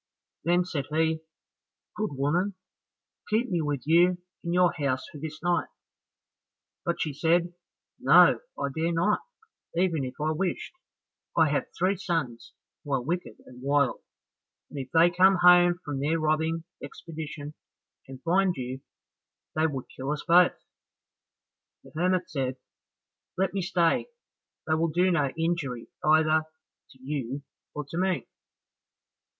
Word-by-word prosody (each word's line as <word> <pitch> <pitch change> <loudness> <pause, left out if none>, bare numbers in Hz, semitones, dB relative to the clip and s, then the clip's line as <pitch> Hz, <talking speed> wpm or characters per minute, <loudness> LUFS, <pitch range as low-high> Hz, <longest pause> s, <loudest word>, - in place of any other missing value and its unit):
Then 175 +1 +3
said 145 -6 -3
he, 160 +1 +1 0.8
"Good 215 - -1
woman, 170 +9 0 0.7
keep 220 +2 +1
me 175 -2 +1
with 145 -4 -2
you 175 +3 +4 0.3
in 170 - -3
your 180 -1 +4
house 140 -5 -1
for 150 - -10
this 155 +2 -7
night;" 175 0 +1 1.2
but 170 - -1
she 150 - -1
said, 170 +4 +1 0.5
"No, - - +6 0.2
I 140 - -1
dare 165 +2 0
not, 175 +6 +2 0.6
even 170 -4 +1
if 130 0 -5
I 155 +1 0
wished, 180 - -2 0.6
I 160 -2 +5
have 145 - 0
three 185 +2 +1
sons 165 -11 -3 0.3
who 145 - -4
are 130 -2 +1
wicked 175 +6 -4
and 125 0 -14
wild, 140 -1 +1 0.7
if 135 -3 -6
they 165 +1 +5
come 185 +2 +5
home 175 -1 +6
from 145 -2 -3
their 155 +4 +1
robbing 160 +1 0 0.2
expedition, 155 -2 -7 0.5
and 130 -1 -11
find 185 +2 +2
you, 130 +1 -5 0.7
they 155 +1 +2
would 135 -4 -4
kill 130 +1 -5
us 150 0 -3
both." 175 +1 +5 1.3
The - - -15
hermit 180 +2 +1
said, 130 -3 -2 0.8
"Let 190 0 +1
me 195 - -1
stay, 170 -2 +1 0.6
they 155 - +1
will 160 +1 +2
do 180 +4 +2
no 150 -5 +2
injury 160 -8 -2
either 155 0 +4 0.4
to 130 - -20
you 135 0 -4 0.3
or 150 -1 -4
to 165 - -4
me." 185 -2 0
160 Hz, 140 wpm, -27 LUFS, 145-175 Hz, 1.3 s, No